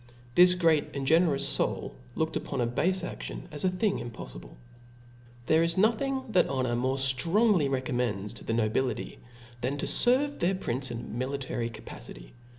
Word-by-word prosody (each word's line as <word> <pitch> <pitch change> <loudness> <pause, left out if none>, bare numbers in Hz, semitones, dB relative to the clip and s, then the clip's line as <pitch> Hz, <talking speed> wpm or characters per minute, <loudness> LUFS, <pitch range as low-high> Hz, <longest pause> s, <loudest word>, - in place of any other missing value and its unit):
This 180 +3 +7
great 165 -6 +1
and 135 -1 -3
generous 160 -1 +3
foul - - -2 0.2
looked 160 0 -1
upon 140 - -3
a 120 - +2
bafe 180 +10 0
adion - - -6
as 150 -1 -4
a 185 - +3
thing 195 +2 0
impofllble. 115 - -9 0.9
There 160 +4 +3
is 165 +1 +1
nothing 260 +6 +1
that 185 -4 +3
honor 130 -3 -1
more 130 +3 0
ftrongly 160 - +3
re 135 -1 0
commends 115 -6 -2
to 115 - -8
the - - -2
nobility, 115 +3 -1 0.4
than 130 +4 -2
to - - -2
ferve 270 +4 +3
their 185 +3 +1
prince 130 -7 -2
in 120 - -4
a - - -11 0.2
niilitary 130 -4 -4
capacity. - - -11
140 Hz, 165 wpm, -28 LUFS, 125-180 Hz, 0.9 s, This